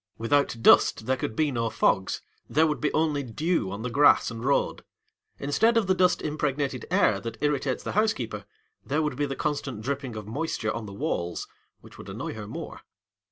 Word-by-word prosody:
Without 120 +2 +1
dust 110 - +5
there 130 +2 +2
could 110 -3 -4
be 155 -2 +1
no 115 -2 -1
fogs, 95 -3 +1 0.3
there 155 +3 +4
would 150 -2 -1
be 150 - +1
only 155 -2 +1
dew 140 - -1
on 100 +3 -5
the 125 - -2
grass 140 -2 +5
and 115 0 -7
road. 140 +2 +1 0.5
Instead 220 +12 +2
of 225 - +3
the 185 - +3
dust 185 -1 +2
impregnated 145 -3 -2
air 100 - +3
that 115 +1 -6
irritates 140 -3 0
the - - -3
housekeeper, 125 - 0 0.4
there 150 +6 0
would 150 - -1
be 145 0 -1
the 135 - -4
constant 140 -6 -3
dripping 135 -2 -3
of 105 -1 -6
moisture 115 -4 -2
on 115 -2 -5
the - - -8
walls, 85 -3 -3 0.3
which - - -15
would - - -9
annoy - - -5
her 110 -2 -7
more. - - -7
135 Hz, 195 wpm, -27 LUFS, 115-150 Hz, 0.5 s, dust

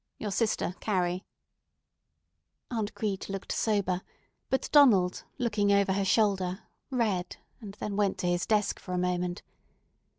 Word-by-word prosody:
Your 210 - -4
sister, 215 -3 0
CARRIE." 185 -2 0 1.5
Aunt 220 -3 -2
Crete 200 -3 -3
looked 195 0 -5
sober; 200 -4 0 0.5
but 265 - 0
Donald, 205 -12 +5 0.2
looking 210 -4 +1
over 200 -1 +3
her 195 0 0
shoulder, 190 -2 +1 0.3
read, 210 -9 -1 0.2
and 205 -4 -9
then 210 -1 -4
went 200 -1 +1
to 180 - -2
his 175 0 0
desk 210 -2 +1
for 180 - -7
a - - 0
moment. 180 0 -1
200 Hz, 135 wpm, -29 LUFS, 180-215 Hz, 1.5 s, Donald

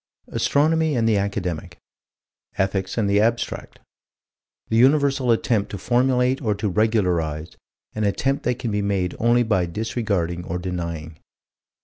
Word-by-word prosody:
Astronomy 155 +1 +2
and 115 -2 +1
the 110 -2 +3
academic. 95 -5 -3 0.8
Ethics 95 +1 -1
and 110 -3 +1
the 100 +1 +3
abstract. 115 +1 -1 0.9
The 110 - 0
universal 135 0 +3
attempt 110 -2 +1
to 100 - -5
formulate 125 +5 +1
or 110 -5 0
to 105 +1 -2
regularize 90 -7 0 0.4
an 110 - -2
attempt 130 +8 0
that 125 -1 +1
can 125 -3 -3
be 105 0 0
made 95 -3 -1
only 120 +1 +3
by 95 -6 +1
disregarding 95 -3 -2
or 90 - -3
denying. 85 -3 -5
105 Hz, 135 wpm, -23 LUFS, 90-120 Hz, 0.9 s, the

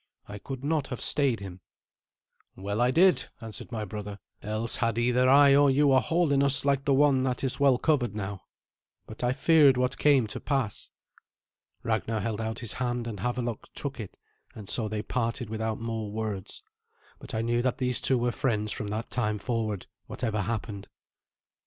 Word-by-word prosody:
I 100 0 -8
could 135 +5 -7
not 150 -2 0
have 125 -3 -6
stayed 135 -7 +1
him." 95 -2 -9 0.9
"Well 100 +4 -3
I 125 - +4
did," 180 +6 +3
answered 115 +1 -9
my 110 -3 -3
brother; 105 0 -7 0.2
"else 110 +2 -1
had 115 -1 0
either 125 +2 +2
I 140 0 +7
or 145 0 +5
you 140 +1 +4
a 130 - +6
hole 165 +6 +1
in 140 -1 +3
us 140 0 +3
like 140 -1 +1
the 140 - +3
one 140 -2 +4
that 130 -1 -1
is 135 +1 -1
well 140 -3 +4
covered 125 -8 0
now. 95 -2 -5 0.6
But 110 - -10
I 125 - +2
feared 145 -1 +5
what 125 +1 -1
came 140 -5 +4
to 105 - -5
pass." 135 -8 -2 0.9
Ragnar 110 0 -1
held 110 +1 -3
out 110 0 -3
his 115 -3 -3
hand, 120 -2 -2
and 110 -4 -6
Havelok 120 0 -3
took - - -5
it, - - -8 0.4
and 105 -3 -10
so 110 +1 0
they 105 0 -3
parted 115 -2 -3
without 110 0 -2
more 115 -2 -4
words; 105 -3 -5 0.6
but - - -8
I 110 - -1
knew 120 +1 +1
that 125 -1 0
these 125 -1 +2
two 130 - +3
were 120 0 0
friends 105 -4 -1
from 105 - -4
that 110 +2 -4
time 105 -4 0
forward, 110 -4 -3 0.2
whatever 110 -4 -2
happened. 105 -1 -4
120 Hz, 185 wpm, -27 LUFS, 110-135 Hz, 0.9 s, I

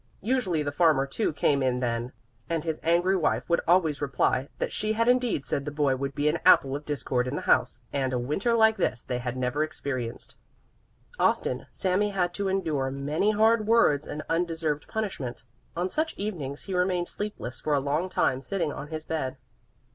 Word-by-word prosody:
Usually 205 -10 +1
the 145 - -2
farmer 150 -3 +3
too 165 +10 -1
came 145 -1 +1
in 125 -1 +1
then, 120 0 -2 0.4
and 165 -2 -1
his 160 -2 -2
angry 175 +3 +3
wife 175 - 0
would 170 - +2
always 165 -5 +3
reply 135 -1 +1
that - - -2
she 215 +1 0
had 230 +1 +1
indeed 245 - +2
said 140 - -1
the 150 - -4
boy 145 -2 +1
would 140 +1 -4
be 145 +1 +1
an 150 - +1
apple 135 0 +5
of 145 +1 -6
discord 130 -4 -1
in 130 - -3
the - - -4
house, 125 -1 +2
and 135 -2 0
a 125 - 0
Winter 150 - 0
like 220 -1 +5
this 120 - -1
they 125 - -3
had 125 0 -4
never 130 +4 0
experienced. 130 -6 -5 0.9
Often - - +1
Sami 190 +2 0
had 180 -3 0
to 200 +1 -2
endure 160 -8 0
many 145 +8 0
hard 215 +1 +3
words 185 -11 +4
and 150 - -5
undeserved 165 -3 -1
punishment. 190 - -4 0.3
On 175 +2 0
such 315 +10 -1
evenings 155 -10 -4
he 195 - -5
remained 180 -1 +1
sleepless 205 -12 -5
for 150 -1 0
a - - +3
long 150 +6 -1
time 130 -7 +1
sitting 165 +2 -2
on 145 - -7
his 155 0 -5
bed. 155 -5 -3
155 Hz, 190 wpm, -27 LUFS, 135-190 Hz, 0.9 s, apple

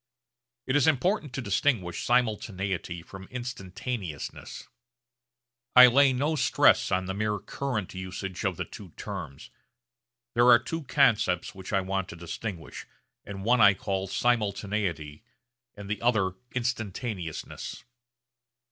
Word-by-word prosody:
It 130 - 0
is 145 -1 +4
important 160 - +1
to 135 - -3
distinguish 100 -3 0
simultaneity 100 -7 -1
from 95 +2 -11
instantaneousness. 105 - -6 1.1
I 125 0 +12
lay 135 +2 +5
no 145 +5 0
stress 130 - +4
on 95 +1 +1
the 95 - -3
mere 105 +1 -1
current 110 -3 -4
usage 95 0 -5
of - - -1
the - - -3
two 100 - -11
terms. 70 - -7 0.8
There 120 +1 +4
are 120 -1 +9
two 155 +6 -5
concepts 115 -10 +2
which 95 -2 -9
I 95 - +2
want 95 0 -2
to - - -8
distinguish, 85 0 -7 0.4
and 95 -1 -7
one 120 +1 +4
I 100 -1 +7
call 95 0 -2
simultaneity 100 -9 -1 0.5
and 100 -1 -9
the 105 +1 -3
other 110 -6 +2 0.2
instantaneousness. 110 -7 -4
105 Hz, 125 wpm, -28 LUFS, 95-125 Hz, 1.1 s, I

